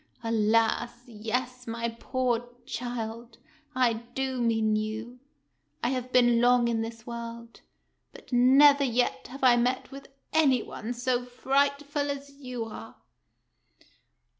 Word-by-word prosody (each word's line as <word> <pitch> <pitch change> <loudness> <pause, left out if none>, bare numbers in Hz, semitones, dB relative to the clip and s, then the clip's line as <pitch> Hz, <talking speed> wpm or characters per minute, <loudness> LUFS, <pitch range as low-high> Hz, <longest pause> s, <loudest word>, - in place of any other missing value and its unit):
"Alas, 230 +2 +1
yes, 245 +3 -4
my 230 +1 -2
poor 245 -2 -1 0.2
child, 235 -1 -5 0.4
I 250 -2 +3 0.2
do 265 -1 -1
mean 225 -2 +2
you. 220 +3 -4 0.6
I - - +2
have 255 -1 -3
been 240 -2 +4
long 245 0 +4
in 230 -1 0
this 225 0 -7
world, 235 0 -8 0.5
but - - -13
never 280 +3 +6
yet 245 -1 0
have 270 +2 -10
I 245 -2 +6
met 250 +3 0
with 275 0 -10 0.3
any 275 -7 +4
one 230 +3 -6
so 245 0 0
frightful 280 +3 0
as 280 0 -5
you 255 -4 -6
are." 225 0 -9
245 Hz, 125 wpm, -28 LUFS, 230-255 Hz, 0.6 s, never